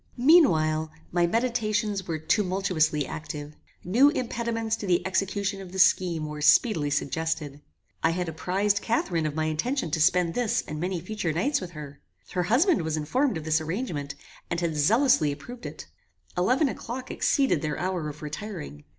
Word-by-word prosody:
Meanwhile, 160 Hz, -, +4 dB, 0.2 s
my 175 Hz, 0 st, +2 dB
meditations 215 Hz, -3 st, 0 dB
were 165 Hz, -2 st, -2 dB
tumultuously 180 Hz, -3 st, +1 dB
active. 150 Hz, 0 st, -7 dB, 0.3 s
New 240 Hz, +11 st, +5 dB
impediments 230 Hz, -5 st, -2 dB
to 205 Hz, -, -6 dB
the 175 Hz, -2 st, +2 dB
execution 195 Hz, +1 st, -1 dB
of 185 Hz, -2 st, -10 dB
the 190 Hz, -, -7 dB
scheme 175 Hz, -3 st, +3 dB
were 150 Hz, 0 st, -6 dB
speedily 155 Hz, -, +4 dB
suggested. 145 Hz, 0 st, -2 dB, 0.4 s
I -, -, +3 dB
had 175 Hz, +1 st, -2 dB
apprized 195 Hz, +5 st, 0 dB
Catharine 175 Hz, -8 st, 0 dB
of 150 Hz, -, -5 dB
my 155 Hz, 0 st, 0 dB
intention 170 Hz, -, -1 dB
to 160 Hz, -, 0 dB
spend 170 Hz, +1 st, +3 dB
this 245 Hz, -3 st, 0 dB
and 150 Hz, 0 st, -5 dB
many 180 Hz, +1 st, -2 dB
future 185 Hz, -2 st, -3 dB
nights 260 Hz, -, 0 dB
with 180 Hz, -2 st, -7 dB
her. 145 Hz, -2 st, -9 dB, 0.3 s
Her 180 Hz, -, 0 dB
husband 310 Hz, -, +4 dB
was 160 Hz, -1 st, -2 dB
informed 250 Hz, -, 0 dB
of 160 Hz, -, -6 dB
this 160 Hz, 0 st, +1 dB
arrangement, 160 Hz, -, -4 dB, 0.3 s
and 170 Hz, -, -1 dB
had 170 Hz, -2 st, -1 dB
zealously 180 Hz, -, +3 dB
approved 235 Hz, -, -8 dB
it. -, -, -9 dB, 0.5 s
Eleven 250 Hz, -, +2 dB
o'clock 255 Hz, 0 st, -5 dB
exceeded 270 Hz, -, +2 dB
their 150 Hz, -1 st, -2 dB
hour 180 Hz, -3 st, -2 dB
of 150 Hz, +1 st, -10 dB
retiring. 150 Hz, -, -7 dB
180 Hz, 165 wpm, -26 LUFS, 155-220 Hz, 0.5 s, New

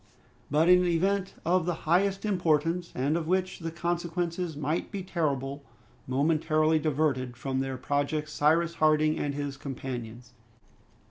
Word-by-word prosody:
But 155 Hz, +4 st, +3 dB
an 180 Hz, 0 st, +6 dB
event 190 Hz, +3 st, 0 dB
of 175 Hz, 0 st, +2 dB
the 175 Hz, -, 0 dB
highest 195 Hz, +5 st, +2 dB
importance, 170 Hz, -3 st, +1 dB
and 140 Hz, +5 st, +1 dB
of 165 Hz, -2 st, -2 dB
which 185 Hz, +1 st, 0 dB
the 165 Hz, -1 st, -4 dB
consequences 170 Hz, 0 st, -2 dB
might 150 Hz, +3 st, -2 dB
be 200 Hz, -3 st, -4 dB
terrible, 140 Hz, -6 st, -2 dB, 0.5 s
momentarily 155 Hz, +3 st, +2 dB
diverted 140 Hz, -5 st, 0 dB
from 130 Hz, 0 st, -2 dB
their 135 Hz, -1 st, -2 dB
projects 145 Hz, +3 st, -1 dB
Cyrus 165 Hz, +3 st, +2 dB
Harding 155 Hz, -1 st, +3 dB
and 145 Hz, -1 st, -2 dB
his 145 Hz, -1 st, -4 dB
companions. 125 Hz, -3 st, -7 dB
155 Hz, 135 wpm, -28 LUFS, 140-175 Hz, 0.5 s, an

